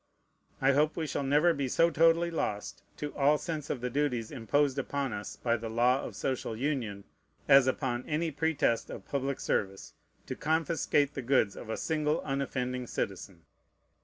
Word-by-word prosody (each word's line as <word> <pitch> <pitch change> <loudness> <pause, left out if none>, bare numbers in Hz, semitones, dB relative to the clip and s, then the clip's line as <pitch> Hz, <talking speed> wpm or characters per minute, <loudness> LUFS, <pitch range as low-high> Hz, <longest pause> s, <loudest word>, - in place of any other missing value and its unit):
I 135 +1 +4
hope 150 +3 +2
we 160 - -1
shall 145 - -2
never 150 +5 +3
be 140 -3 -2
so 165 +6 +3
totally 165 +2 +4
lost 105 -10 -3 0.2
to 150 -1 -5
all 145 +1 +4
sense 155 -3 -5
of 125 - -3
the 125 - -2
duties 125 -5 -1
imposed 140 +2 +1
upon 135 -1 -2
us 105 0 -6
by 120 -1 0
the 115 0 -6
law 125 +4 +3
of - - -7
social 130 -4 -2
union, 115 -6 -2 0.4
as, 135 -1 +7
upon 130 -2 -1
any 160 +2 0
pretest 145 -6 0
of - - -8
public 140 -1 -2
service, 95 -1 -2 0.3
to - - -5
confiscate 155 -2 +1
the 135 - -4
goods 120 -5 +2
of 115 - -9
a 110 - -2
single 155 -2 0
unoffending 125 -2 -2
citizen. 95 -5 -4
135 Hz, 170 wpm, -30 LUFS, 120-150 Hz, 0.4 s, as